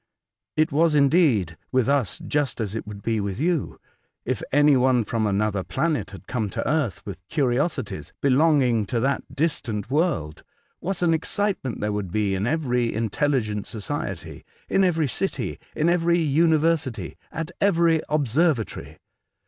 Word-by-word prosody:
It 155 0 +3
was, 155 +2 +3
indeed, 140 - +3
with 130 -2 +2
us 140 -8 +1
just 145 -4 -1
as 105 -3 -2
it 110 - -5
would 100 -1 -8
be 115 -1 0
with 100 +1 -3
you, 165 0 -1 0.5
if - - -2
any 145 +1 +5
one 125 -2 +3
from 110 0 -1
another 100 -1 0
planet 155 - -1
had 95 -1 -11
come 110 -2 -2
to - - -3
earth 145 -9 -1
with 95 -5 -7
curiosities 130 - -1
belonging 135 -6 +3
to 120 - -1
that 135 +4 -2
distant 130 -9 -1
world; 145 - 0 0.4
what 185 0 -3
an 165 -2 +4
excitement 165 - -2
there 105 0 0
would 100 -4 -3
be 105 -1 0
in 95 +4 -1
every 125 -6 0
intelligent 110 -2 -1
society, 105 -3 -5 0.2
in 195 - +2
every 165 -5 +2
city, 195 +9 -3 0.2
in 155 - +1
every 170 0 +3
university, 160 -4 +1 0.2
at 165 +1 -4
every 170 -5 +3
observatory 145 -2 0
135 Hz, 150 wpm, -24 LUFS, 110-160 Hz, 0.5 s, any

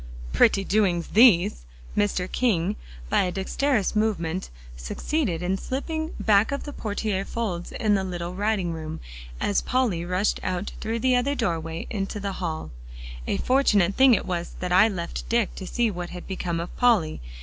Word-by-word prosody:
"Pretty 195 - +4
doings 190 -4 +1
these!" 185 - +5 0.3
Mr. 200 -3 +1
King, 205 -5 +1 0.3
by - - +3
a 180 - 0
dexterous 215 +4 0
movement, 190 -5 0 0.3
succeeded 175 - -2
in 190 +2 0
slipping 315 +4 -3
back 210 +2 +4
of 280 - -3
the 290 - -7
portiere 205 -2 -2
folds 195 -6 -4
into 210 -3 +1
the 190 - -1
little 175 -1 -4
writing 195 -3 0
room, 155 -1 -6 0.4
as 205 - +1
Polly 240 -10 0
rushed 180 +4 0
out 185 +2 -2
through 225 +1 -2
the 255 +2 +2
other 265 +3 +1
doorway 165 - -2
into 200 -1 -3
the 200 0 -3
hall. 160 -3 -3 0.6
"A - - 0
fortunate 210 -8 +3
thing 265 0 +6
it - - -2
was 175 -1 -3
that 180 -1 -3
I 185 +4 +6
left 175 -5 -5
Dick, 230 -3 +1
to 190 - -7
see 235 +1 +1
what 175 -2 -5
had 180 -1 -8
become 180 -3 -3
of 170 - -6
Polly. 210 - +3
195 Hz, 170 wpm, -25 LUFS, 175-225 Hz, 0.6 s, thing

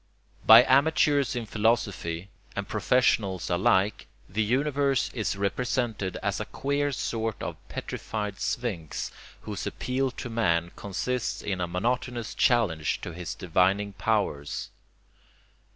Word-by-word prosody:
By 115 +2 +11
amateurs 140 0 +3
in 120 -2 -2
philosophy 100 -5 0 0.3
and - - -3
professionals 100 -8 +1
alike, 95 +3 +2 0.2
the 105 +4 -1
universe 135 +4 +1
is 110 -4 -1
represented 105 -1 -1
as - - 0
a - - -3
queer 145 +1 -1
sort 115 -4 -2
of - - -3
petrified 105 -2 -4
sphinx 100 -11 -3 0.3
whose - - -5
appeal 130 +1 -1
to 125 - -7
man 85 -8 +1
consists 115 +5 -3
in 95 -3 -2
a 90 - 0
monotonous 120 +6 -2
challenge 95 -11 +2
to 85 - -6
his 90 0 -5
divining 95 +3 +1
powers. 100 -10 -1
110 Hz, 120 wpm, -27 LUFS, 95-125 Hz, 0.3 s, By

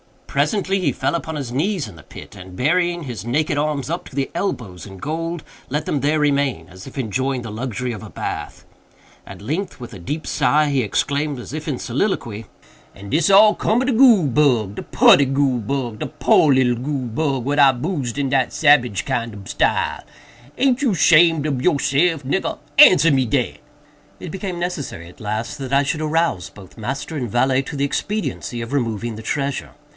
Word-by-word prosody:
Presently 195 -2 0
he 185 - 0
fell - - -1
upon 160 -1 -3
his 135 -5 -5
knees 160 - -1
in 85 - -14
the 75 - -14
pit, - - -12
and, 95 -1 -11
burying 175 - +1
his 120 -7 -6
naked 145 +5 0
arms 150 -1 -1
up 170 +2 -4
to - - -15
the 140 -1 -2
elbows 100 - -4
in 95 -2 -11
gold, 165 - -4 0.3
let 150 +3 -2
them 145 - -1
there 150 +3 +1
remain, 140 -2 0
as 95 +4 -12
if 135 - -11
enjoying 130 +2 -1
the 115 -2 -7
luxury 125 +2 -4
of 110 - -7
a 110 - -10
bath. - - -6 0.6
At - - -10
length, 160 - -4
with 120 0 -8
a 100 - -9
deep 150 - -5
sigh, 150 0 +2
he 140 -2 +1
exclaimed, 140 +7 -1
as 120 -2 -9
if 155 +1 -6
in 145 - -1
a - - -9
soliloquy: 120 - -2 0.5
"And 100 0 -10
dis 160 +3 +2
all 210 +2 +7
cum 225 +3 +1
ob 260 - -1
de 265 - +2
goole 230 - +6
bug! 120 -7 +2
de - - -6
putty 140 - +5
goole 135 -2 +1
bug! 120 -1 -3
de - - -3
poor 150 0 +3
little 125 -2 +2
goole 135 -2 -3
bug, 135 +2 -1
what 145 +2 0
I 135 -2 +7
boosed 135 -2 -3
in 140 -2 0
dat 130 -2 +1
sabage 130 -9 +3
kind 120 -5 -2
ob 100 -1 -11
style! - - 0 0.5
Aint 265 -1 +2
you 245 -9 +1
shamed 165 -1 +5
ob 140 -4 -1
yourself, 145 +1 +2
nigger?—answer 165 - +4
me 135 -2 +2
dat!" 125 +1 -1 0.6
It 175 - -7
became 190 -1 -5
necessary, 140 - -5
at 90 - -18
last, 110 +6 -4
that 135 -1 -6
I 140 +1 +4
should 150 +3 -2
arouse 155 - 0
both 100 +1 -15
master 135 +7 -4
and 125 -4 -3
valet 130 +4 +2
to 140 - -7
the 140 0 0
expediency 170 - -3
of 115 +2 -6
removing 115 -4 -2
the - - -7
treasure. 140 +4 -3
140 Hz, 200 wpm, -20 LUFS, 120-155 Hz, 0.6 s, all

